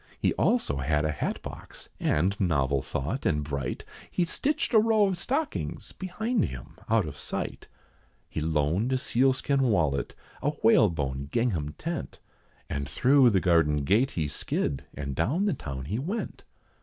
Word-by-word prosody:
He - - +1
also 240 - +1
had 75 +3 +1
a 75 - +1
hatbox, 75 - -5
and 90 +7 +1
novel 70 -7 +1
thought, 75 - -3
and 75 -2 +1
bright; 70 -4 -4 0.2
He 180 - +1
stitched 275 - -1
a 220 - +8
row 220 -1 +4
of 195 -2 0
stockings 275 - -2
behind 210 +4 -1
him 60 -2 -8
out 110 -4 +3
of 75 - -8
sight, - - -4 0.6
He - - -4
loaned 80 - +1
a - - +3
sealskin 135 +2 +2
wallet, 85 - +1 0.3
a 145 +2 0
whalebone 75 - +3
gingham 90 -12 0
tent, 170 +1 -5 0.5
And 70 -1 -3
through 130 - +5
the 100 -4 +3
garden 80 -5 +3
gate 110 - +3
he 80 -3 +1
skid, 70 -1 -2
and 70 -2 -4
down 145 - +1
the 200 - +2
town 65 - -6
he 105 - -2
went. 190 - -4
95 Hz, 155 wpm, -28 LUFS, -, 0.6 s, a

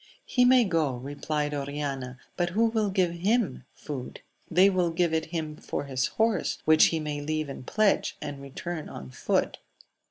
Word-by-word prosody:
He 250 -1 +3
may 250 0 +6
go, 160 - +1
replied 145 +3 -3
Oriana, 140 -3 -4 0.2
but 175 -1 0
who 215 +6 +2
will 220 -2 +1
give 185 -3 +2
him 185 - 0
food? 135 -4 -7
— - - -38
They 180 +3 +6
will 185 -3 +2
give 165 0 +1
it 160 - +1
him 160 -2 -4
for - - -4
his 130 -2 -1
horse, 225 -1 0
which 155 0 +7
he 165 - +1
may 150 -1 -3
leave 155 0 -2
in 135 - -7
pledge, 215 - +1
and 145 -2 -6
return 155 +4 -6
oh 65 - -8
foot. - - 0
155 Hz, 180 wpm, -27 LUFS, 145-185 Hz, 0.2 s, which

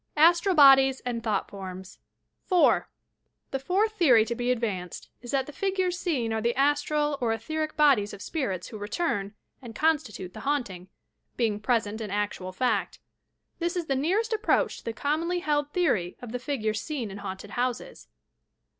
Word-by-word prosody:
ASTEAL 345 +4 +5
BODIES 270 -2 +7
AND 240 -2 -3
THOUGHT 215 -3 -1
POHMS 190 -1 -9 0.5
4. 365 -3 +3 0.6
The 270 - -1
fourth 385 +10 +1
theory 275 - +5
to 235 - -2
be 245 +1 -2
advanced 210 -8 -3
is 240 - -10
that 270 -1 +1
the 295 - -9
figures 375 -1 -1
Been 250 -11 0
are 220 - -1
the 235 +2 +1
a 275 +3 +4
stral 295 0 -1
or 235 -2 +1
etheric 310 +8 -3
bodies 270 -9 +4
of 200 - -9
spirits 200 - -3
who 215 - -8
return 205 - -2 0.3
and 235 -4 -10
constitute 275 - 0
the - - -9
haunting, 235 -11 -2 0.3
— - - -48
being 220 -4 0
present 220 -1 0
in 215 - -4
actual 205 -2 -3
fact. 245 +7 -1 0.6
This 345 +1 -1
is 350 -2 -2
the 275 - 0
nearest 390 - 0
approach 440 +1 +1
to - - -20
the 230 - -3
commonly 315 +8 -1
held 295 -2 0
theory 255 - 0
of 245 -3 -8
the 250 - -3
figures 220 -6 -2
seen 255 -8 -4
in 200 - -8
haunted 200 0 -7
houses. 255 - -3
255 Hz, 175 wpm, -27 LUFS, 215-310 Hz, 0.6 s, BODIES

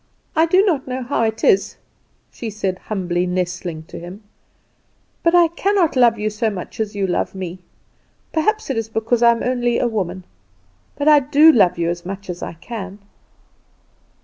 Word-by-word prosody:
"I 325 +1 +4
do 370 +4 +4
not 310 -10 0
know 255 0 -3
how 245 +1 -1
it 220 0 -1
is," 195 - +3 0.5
she 230 - -6
said 195 -3 -3
humbly, 180 -3 -2
nestling 180 -2 -3
to - - -10
him, 180 +5 -10 1.0
"but 335 +1 +3
I 345 -1 +6
cannot 370 -1 +1
love 240 -3 +4
you 210 0 -2
so 220 +2 0
much 195 0 -8
as 215 -1 -2
you 200 -1 0
love 185 +1 -2
me. 185 -1 -6 0.7
Perhaps 430 +2 0
it 255 - -2
is 220 -1 -5
because 225 +2 0
I 235 - +7
am 235 0 +1
only 245 -1 0
a 245 - +1
woman; 185 -5 -3 0.7
but 290 - -2
I 300 -1 +8
do 295 +3 +6
love 195 - +3
you 170 -1 0
as 175 0 -6
much 195 +1 -6
as 175 - -9
I - - -5
can." 195 +2 -8
220 Hz, 180 wpm, -20 LUFS, 185-265 Hz, 1.0 s, I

